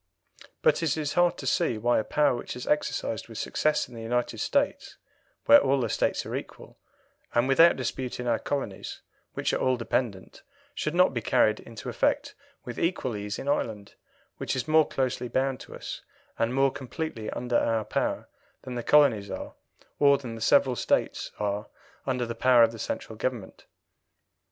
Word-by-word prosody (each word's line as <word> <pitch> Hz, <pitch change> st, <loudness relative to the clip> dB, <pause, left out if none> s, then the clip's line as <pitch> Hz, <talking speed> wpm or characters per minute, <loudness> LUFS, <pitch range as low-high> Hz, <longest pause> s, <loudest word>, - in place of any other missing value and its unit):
But 480 Hz, -, +4 dB
it 160 Hz, -2 st, 0 dB
is 150 Hz, -2 st, -2 dB
hard 175 Hz, 0 st, +3 dB
to -, -, -7 dB
see 120 Hz, -2 st, +1 dB
why 120 Hz, +2 st, +2 dB
a -, -, -1 dB
power 150 Hz, +3 st, +2 dB
which 120 Hz, -, -6 dB
is 125 Hz, -, -6 dB
exercised 115 Hz, -7 st, -1 dB
with 115 Hz, -2 st, -10 dB
success 155 Hz, +5 st, 0 dB
in 125 Hz, -, -15 dB
the 115 Hz, -, -8 dB
United 120 Hz, 0 st, -1 dB
States, 280 Hz, -, -1 dB, 0.5 s
where 285 Hz, 0 st, +8 dB
all 135 Hz, +1 st, +2 dB
the 120 Hz, -3 st, -1 dB
States -, -, 0 dB
are -, -, -4 dB
equal, -, -, -8 dB, 0.6 s
and 120 Hz, +2 st, +3 dB
without 165 Hz, +6 st, +6 dB
dispute 130 Hz, -1 st, -4 dB
in 125 Hz, -, -4 dB
our 120 Hz, -2 st, +1 dB
colonies, 135 Hz, -9 st, -4 dB, 0.3 s
which -, -, -1 dB
are -, -, +1 dB
all 130 Hz, -1 st, +2 dB
dependent, 115 Hz, -4 st, -3 dB, 0.3 s
should 150 Hz, +2 st, -3 dB
not 180 Hz, -4 st, +4 dB
be 120 Hz, -, -2 dB
carried 110 Hz, 0 st, +3 dB
into 115 Hz, -2 st, -10 dB
effect -, -, 0 dB, 0.3 s
with 120 Hz, -1 st, -6 dB
equal 165 Hz, -9 st, -1 dB
ease 105 Hz, 0 st, -4 dB
in -, -, -7 dB
Ireland, 110 Hz, -7 st, -2 dB, 0.4 s
which -, -, -2 dB
is 130 Hz, -, -2 dB
more 155 Hz, 0 st, +5 dB
closely 125 Hz, -2 st, -1 dB
bound 130 Hz, +1 st, 0 dB
to -, -, -10 dB
us -, -, -7 dB, 0.4 s
and 115 Hz, +1 st, +1 dB
more 135 Hz, +1 st, +3 dB
completely 130 Hz, -3 st, -5 dB
under 120 Hz, -1 st, -1 dB
our 115 Hz, -2 st, 0 dB
power -, -, -2 dB, 0.4 s
than 130 Hz, -, -6 dB
the 120 Hz, -, -3 dB
colonies 120 Hz, -7 st, +4 dB
are, -, -, -6 dB, 0.5 s
or 140 Hz, -1 st, +6 dB
than 125 Hz, -4 st, -7 dB
the 115 Hz, -, -8 dB
several 135 Hz, +1 st, +4 dB
States -, -, 0 dB
are 105 Hz, 0 st, -2 dB, 0.4 s
under 125 Hz, -2 st, 0 dB
the 115 Hz, -, -4 dB
power 125 Hz, -1 st, +5 dB
of 115 Hz, -, +4 dB
the 115 Hz, -, -10 dB
Central 110 Hz, -, -4 dB
Government. 115 Hz, -3 st, -4 dB
125 Hz, 185 wpm, -27 LUFS, 115-140 Hz, 0.6 s, where